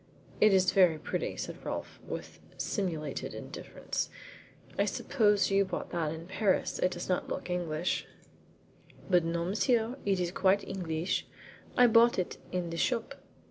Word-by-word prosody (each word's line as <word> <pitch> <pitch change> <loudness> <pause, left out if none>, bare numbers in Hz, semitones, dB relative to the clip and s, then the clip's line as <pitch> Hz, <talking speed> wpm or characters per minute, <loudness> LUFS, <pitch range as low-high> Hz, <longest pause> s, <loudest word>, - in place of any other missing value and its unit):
"It 215 - +6
is 185 -1 +4
very 180 -5 +5
pretty," 155 - -3
said - - -6
Rolfe, - - -5
with - - -7 0.2
simulated 170 -7 -3
indifference. - - -4 0.7
"I - - +2
suppose 210 -6 +2
you 195 0 +5
bought 185 -2 -5
that 165 -3 -1
in 160 +1 -6
Paris. 190 +2 0
It 180 - +3
does 175 -1 -5
not 180 - 0
look - - -4
English,'' 175 -1 -1 1.0
"But 180 -2 +5
no, 170 +1 -1
monsieur, 225 +5 +1
it 195 -2 +1
is 175 -1 0
quite 195 +2 +3
Engleesh. 170 -2 -2 0.5
I 245 - +8
bought 235 0 +6
it 185 - -2
in 180 -2 -2
the 165 - -4
shop." 230 +4 0
185 Hz, 150 wpm, -31 LUFS, 170-205 Hz, 1.0 s, I